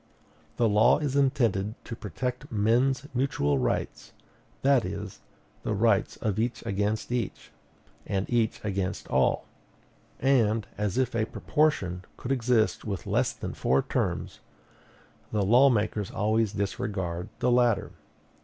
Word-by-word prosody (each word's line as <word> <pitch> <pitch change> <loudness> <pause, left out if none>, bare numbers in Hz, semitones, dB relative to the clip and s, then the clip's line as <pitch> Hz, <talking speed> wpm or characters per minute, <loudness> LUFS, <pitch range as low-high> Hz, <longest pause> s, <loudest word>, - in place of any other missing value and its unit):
The 115 - +3
law 110 +4 +5
is 145 -3 -2
intended 115 -7 +1
to 115 - -6
protect 125 - -5
men's 120 +6 +2
mutual 75 - +1
rights, 60 -1 -2 0.5
that 135 -3 +4
is, 100 +1 -6 0.4
the 110 - -2
rights 105 -1 +2
of 105 -1 -2
each 120 +1 -2
against 105 +2 -1
each, 120 -4 -3 0.6
and 95 0 -1
each 115 -2 +1
against 95 -2 -2
all; - - +2 0.7
and, 115 -5 +2
as 105 0 -2
if 130 -2 +1
a 110 -1 +1
proportion 95 - 0
could 125 - -5
exist 120 -3 +2
with 100 -5 -4
less - - +1
than - - -6
four 65 +1 +1
terms, - - -2 0.9
the 105 -2 +1
law 125 +7 +6
makers 105 -3 0
always 110 0 +1
disregard 95 -2 -3
the 125 - +1
latter. 120 -3 +2
110 Hz, 130 wpm, -27 LUFS, 100-125 Hz, 0.9 s, law